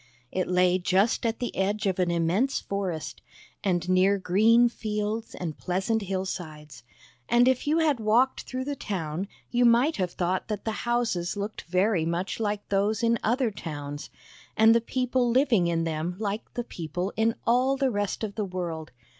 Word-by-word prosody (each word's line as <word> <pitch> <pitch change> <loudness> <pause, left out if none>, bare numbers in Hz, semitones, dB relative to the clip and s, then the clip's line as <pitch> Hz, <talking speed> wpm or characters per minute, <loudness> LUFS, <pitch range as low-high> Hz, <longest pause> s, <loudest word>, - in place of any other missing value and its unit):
It 185 -1 -1
lay 180 0 +3
just 195 +6 +2
at 225 0 -1
the 245 - -4
edge 205 +3 0
of 190 -1 0
an 180 -1 +2
immense 170 +11 +1
forest, 175 -8 -4 0.4
and 180 -2 0
near 185 +2 +4
green 220 +6 +4
fields 215 -1 -3
and 165 -4 -5
pleasant 190 +5 0
hillsides; 170 -8 -5 0.5
and 240 +1 +5
if 260 +2 +1
you 310 +2 +3
had 305 -6 +2
walked 230 +5 +2
through 255 0 -5
the 285 +1 -3
town 185 - -4 0.2
you 245 0 +2
might 245 +6 +4
have 185 -3 0
thought 180 +1 -1
that 210 -2 -4
the 220 +1 -3
houses 225 -7 0
looked 205 +2 -4
very 185 -1 +2
much 170 +6 -2
like 210 -2 -2
those 205 +3 +1
in 230 0 +3
other 240 +1 +1
towns, 145 -5 -6 0.5
and 220 +1 +7
the 230 - +3
people 250 +1 0
living 235 -7 +3
in 165 -1 0
them 165 +2 -2
like 210 +1 -4
the 240 - -2
people 175 -1 -4
in 225 +1 +2
all 255 +3 +3
the 270 -1 +1
rest 205 0 -2
of 210 -2 -3
the 210 -1 -2
world. 170 -4 -5
205 Hz, 175 wpm, -27 LUFS, 180-235 Hz, 0.5 s, and